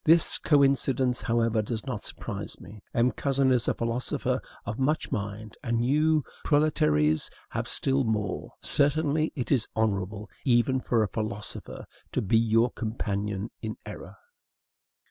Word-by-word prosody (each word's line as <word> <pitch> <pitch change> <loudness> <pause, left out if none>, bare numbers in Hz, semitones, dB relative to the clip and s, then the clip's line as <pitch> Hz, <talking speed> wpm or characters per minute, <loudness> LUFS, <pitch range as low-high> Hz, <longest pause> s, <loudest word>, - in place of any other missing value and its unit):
This 165 +1 +5
coincidence, 135 -3 +3
however, 115 -1 +1
does 110 +2 -4
not 125 -6 -4
surprise - - -4
me. 105 0 -12
M. 120 +2 +3
Cousin 135 +2 +1
is 125 -2 +2
a - - +2
philosopher 115 +2 -1 0.2
of 110 - -4
much 150 +4 0
mind, 105 +1 -4
and 120 0 0
you, 155 +3 +3 0.2
proletaires, 80 - +2 0.2
have - - -3
still 135 0 +1
more. 105 -4 -2
Certainly 155 +2 +2
it 125 -5 -3
is 125 -6 +3
honorable, 105 -1 -1 0.2
even 130 +1 +3
for 120 -3 +1
a - - 0
philosopher, 105 0 -5 0.3
to - - +1
be 110 +3 +3
your 115 +2 +3
companion 105 -2 -3
in 110 -1 -4
error. - - -9
115 Hz, 140 wpm, -27 LUFS, 110-135 Hz, 0.3 s, This